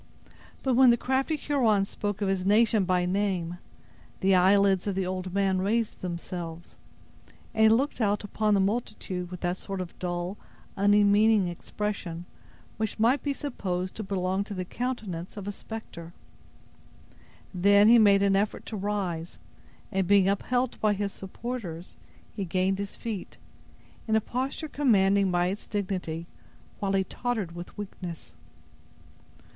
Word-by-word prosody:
But 265 - +2
when 255 +1 +7
the 235 - +5
crafty 265 +6 0
Huron 235 -10 +2
spoke 205 0 -3
of - - 0
his 190 -1 0
nation 210 0 +4
by 180 -1 +2
name, 180 -2 -1 0.6
the 195 0 +4
eyelids 195 +1 +4
of 200 - -1
the 190 -1 0
old 185 0 -3
man 190 -1 +1
raised 220 +4 0
themselves, 170 -1 -6 0.8
and 220 - 0
he - - +7
looked 255 +4 +1
out 210 -1 +1
upon 210 +1 +1
the - - +3
multitude 190 -3 -2
with 180 -1 -8
that 175 0 -1
sort 195 0 -5
of 180 -2 -7
dull, 175 +2 -3 0.4
unmeaning 205 0 +4
expression 175 -1 -4 0.5
which 220 -1 -2
might 235 +6 +3
be 285 - -1
supposed 190 -11 -3
to - - -6
belong 190 -1 -1
to 205 - -6
the 185 -1 -3
countenance 210 -7 -4
of 200 -1 -6
a - - -1
specter. 185 -6 -8 1.4
Then 200 +3 +5
he 235 +1 +8
made 200 -2 +5
an 195 -1 +3
effort 200 +2 -1
to 225 - -5
rise, 190 -5 -3 0.5
and 190 -3 0
being 200 -1 +5
upheld 245 +5 0
by 215 -1 +3
his 200 0 -2
supporters, 190 -4 -6 0.4
he 200 - -2
gained 185 +2 0
his 200 -1 -5
feet, 220 -5 -6 0.7
in 220 - +2
a - - +5
posture 260 +7 -3
commanding 200 -9 +3
by 175 -1 +2
its 200 +3 -5
dignity, 185 -5 -3 0.5
while 195 -1 -1
he 195 -1 +3
tottered 220 -3 -3
with 175 +4 -9
weakness. 185 -4 -7
200 Hz, 150 wpm, -27 LUFS, 185-220 Hz, 1.4 s, he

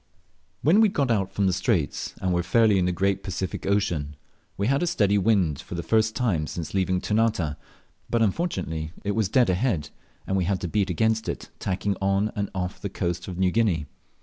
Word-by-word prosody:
When 180 +9 +5
we 220 - +6
had 195 - -6
got 135 -4 +2
out 95 -3 -1
of 100 - +3
the 95 - +2
Straits, 90 -4 -1
and 95 -1 0
were 85 - +2
fairly 105 +2 +3
in 90 - +2
the 90 - +1
great 95 +2 0
Pacific 95 -1 -4
Ocean, 85 -8 0 0.4
we 100 - 0
had 135 +4 +2
a 175 - +1
steady 105 - +2
wind 95 -8 +2
for - - -8
the 85 - -3
first 110 +1 +2
time 90 -12 0
since 85 -3 -5
leaving 95 -1 +1
Ternate, 105 -8 0 0.5
but 115 -1 +2
unfortunately 90 - -2
it 100 - 0
was 105 -2 0
dead 120 -4 +4
ahead, 90 - 0 0.3
and 95 - -1
we 90 - +1
had 95 +1 0
to 90 - -2
beat 100 +2 0
against 110 +5 +1
it, - - -5
tacking 100 +1 -1
on 100 +2 +1
and 100 -1 -2
off 90 0 -3
the 100 - -3
coast 90 -2 -3
of 90 -2 -6
New 95 -1 +2
Guinea. 95 -9 +1
95 Hz, 210 wpm, -25 LUFS, 90-110 Hz, 0.5 s, we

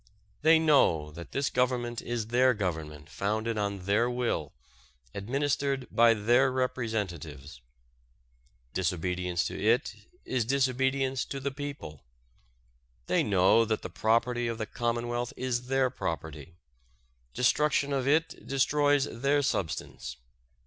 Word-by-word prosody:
They 160 +2 +6
know 135 - +3
that 85 +3 -10
this 140 -1 -1
Government 120 -2 0
is 115 -2 -3
their 125 +1 +4
Government 80 -6 -4
founded 110 +7 -2
on 100 -3 -3
their 105 +5 +2
will, 120 - -2 0.6
administered 135 +4 -1
by 115 0 +5
their 120 +5 +3
representatives. 95 - -3 1.1
Disobedience 90 -1 -1
to - - -4
it 110 -1 +2 0.3
is 125 -3 0
disobedience 130 +1 +1
to 140 - -5
the 140 +1 -2
people. 140 - -7 1.0
They 90 - +2
know 100 +2 +4
that 110 -1 -2
the - - -6
property 115 +4 +1
of 115 -1 -3
the 110 - -3
Commonwealth 120 +2 -2
is 125 -1 -2
their 130 -1 +2
property. 80 - -5 0.8
Destruction 140 +2 +2
of 135 -1 -1
it 160 +3 0
destroys 145 +1 +2
their 140 +3 0
substance. 75 - -3
120 Hz, 120 wpm, -29 LUFS, 95-130 Hz, 1.1 s, They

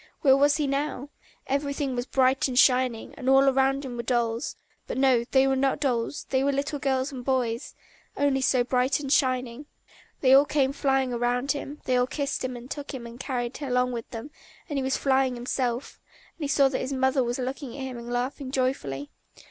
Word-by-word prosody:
Where 265 -2 +6
was 285 +2 +4
he 300 - 0
now? 280 0 -2 0.4
Everything 280 -1 -1
was 245 +1 -3
bright 265 0 +2
and 250 -2 -4
shining, 250 -3 +3
and 260 -1 -1
all 270 0 +5
round 270 +1 +1
him 245 -2 -6
were - - -1
dolls; 235 +1 -1 0.3
but - - -4
no, 260 -3 +4
they 265 0 +4
were 270 0 +2
not 270 +1 +1
dolls, 255 -2 -1
they 265 0 +2
were 280 - +2
little 285 +1 -2
boys 265 +1 0
and 255 -3 -7
girls, 245 -2 -1 0.4
only 280 -1 +2
so 255 -1 +3
bright 255 +3 +1
and 275 -1 -1
shining. 255 0 0 0.5
They 260 -1 +5
all 275 +2 +7
came 275 -2 +1
flying 270 -2 +1
round 245 +3 0
him, 290 0 -5
they 255 - +2
all 250 0 +2
kissed 280 0 -3
him, 250 -1 -5
took 285 0 -6
him 240 -2 -7
and 235 +1 -10
carried 250 -2 -3
him 285 -3 -5
along 250 0 +1
with 235 -2 -5
them, 235 +5 -7 0.4
and 290 -5 -2
he - - -1
was 265 0 0
flying 265 -2 +2
himself, 245 +1 -3 0.3
and 315 - -5
he - - -1
saw 280 0 +4
that 260 - -2
his 260 +2 -3
mother 265 0 +2
was 240 0 -2
looking 260 0 -5
at 270 - -5
him 255 -2 -5
and 235 +1 -8
laughing 255 +3 -2
joyfully. 255 - -2
265 Hz, 210 wpm, -26 LUFS, 250-275 Hz, 0.5 s, all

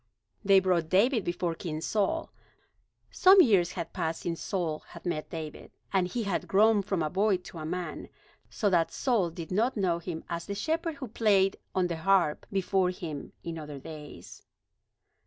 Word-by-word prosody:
They 195 -1 +6
brought 180 -4 +1
David 220 +5 +3
before 175 -1 -1
King 160 -1 -5
Saul. 220 - -1 0.8
Some 380 +1 +7
years 190 - +5
had 170 -3 -5
passed 165 -3 -2
since 170 -1 -3
Saul 165 -5 -2
had 170 - -14
met 155 -3 -2
David, 155 -2 -7 0.2
and 185 -2 +2
he 230 +5 -3
had 200 -3 -2
grown 210 +1 +4
from 195 -4 -1
a 155 - -1
boy 200 0 +2
to 180 -2 -11
a 155 - -5
man, 180 +1 -4 0.4
so 210 - -1
that 170 -2 +3
Saul 225 -10 +1
did 165 0 -8
not 225 +6 +1
know 180 -4 +1
him 170 -1 -6
as 170 0 -4
the 200 - -3
shepherd 325 +8 -1
who 280 -2 -6
had 225 - -14
played 195 -4 +3 0.2
on 185 -1 +2
the 170 -2 -2
harp 175 -2 +2
before 190 -1 +1
him 160 -5 -6
in 165 -1 -5
other 150 -2 -7
days. 150 +1 -10
180 Hz, 180 wpm, -29 LUFS, 165-205 Hz, 0.8 s, Some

